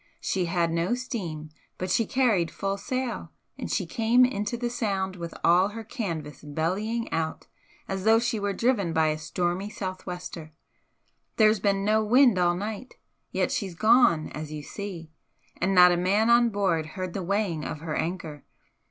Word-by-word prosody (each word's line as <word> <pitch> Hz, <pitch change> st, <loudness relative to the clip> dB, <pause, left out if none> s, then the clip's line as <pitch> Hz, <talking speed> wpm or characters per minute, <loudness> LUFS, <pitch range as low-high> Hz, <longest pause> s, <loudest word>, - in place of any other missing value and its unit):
She 185 Hz, -2 st, -1 dB
had 170 Hz, -1 st, 0 dB
no 170 Hz, +7 st, 0 dB
steam, 170 Hz, -12 st, -5 dB, 0.3 s
but 185 Hz, 0 st, -3 dB
she 225 Hz, +2 st, +2 dB
carried 220 Hz, -11 st, +2 dB
full 195 Hz, 0 st, -2 dB
sail, 255 Hz, +4 st, -3 dB, 0.2 s
and -, -, -6 dB
she -, -, 0 dB
came 240 Hz, +2 st, +3 dB
into 210 Hz, -1 st, -2 dB
the 240 Hz, 0 st, -2 dB
Sound 200 Hz, -6 st, -2 dB
with 170 Hz, -2 st, -7 dB
all 180 Hz, +3 st, +5 dB
her 225 Hz, +2 st, -7 dB
canvas 165 Hz, -, -5 dB
bellying 190 Hz, +10 st, -2 dB
out 160 Hz, -1 st, -2 dB, 0.4 s
as 195 Hz, -1 st, -3 dB
though 220 Hz, +2 st, +6 dB
she 235 Hz, -1 st, 0 dB
were 200 Hz, 0 st, -1 dB
driven 200 Hz, -6 st, +1 dB
by 160 Hz, -1 st, +3 dB
a 155 Hz, 0 st, -2 dB
stormy 175 Hz, +5 st, -2 dB
sou'wester. 180 Hz, -5 st, -6 dB, 0.8 s
There's 215 Hz, -1 st, +5 dB
been 195 Hz, 0 st, +1 dB
no 215 Hz, +1 st, +3 dB
wind 240 Hz, -2 st, +5 dB
all 175 Hz, -1 st, +3 dB
night 215 Hz, +6 st, -6 dB, 0.3 s
yet -, -, 0 dB
she's 190 Hz, -6 st, -3 dB
gone, 215 Hz, -6 st, +4 dB
as 150 Hz, 0 st, -6 dB
you 150 Hz, -1 st, -6 dB
see 175 Hz, -3 st, -7 dB, 0.5 s
and 195 Hz, +1 st, 0 dB
not 180 Hz, 0 st, +8 dB
a 175 Hz, -, +2 dB
man 200 Hz, +6 st, +2 dB
on 235 Hz, 0 st, +5 dB
board 185 Hz, -7 st, 0 dB
heard 185 Hz, -2 st, -4 dB
the 195 Hz, -, -3 dB
weighing 185 Hz, -4 st, -1 dB
of 150 Hz, -, -5 dB
her 160 Hz, -2 st, -4 dB
anchor. 160 Hz, -4 st, -4 dB
190 Hz, 170 wpm, -26 LUFS, 170-220 Hz, 0.8 s, not